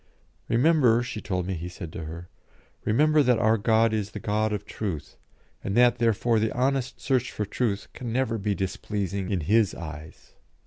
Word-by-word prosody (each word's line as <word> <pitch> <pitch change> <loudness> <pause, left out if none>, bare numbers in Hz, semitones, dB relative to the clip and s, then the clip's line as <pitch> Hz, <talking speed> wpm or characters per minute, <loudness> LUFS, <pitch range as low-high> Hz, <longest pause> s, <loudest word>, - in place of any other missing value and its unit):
"Remember," 120 -2 +4
she 120 -3 -5
told 90 -3 -2
me 95 - -2
he 85 0 -5
said 85 -3 -8
to 80 - -6
her 85 +2 -8 0.6
"remember 150 +7 +4
that 125 -3 +3
our 110 -1 +3
God 110 +1 +3
is 105 -2 -1
the - - -7
God 110 +1 0
of 105 -1 -3
truth, 90 -9 -5 0.5
and 100 +3 -2
that 120 -1 +5
therefore 115 0 +2
the 110 0 0
honest 130 0 0
search 130 -2 0
for 105 - -3
truth 105 -1 -2
can 120 -2 -6
never 115 -2 0
be 100 0 -1
displeasing 95 0 -3
in 95 -4 0
His 105 +5 +2
eyes." 80 -1 -10
110 Hz, 180 wpm, -26 LUFS, 95-120 Hz, 0.6 s, that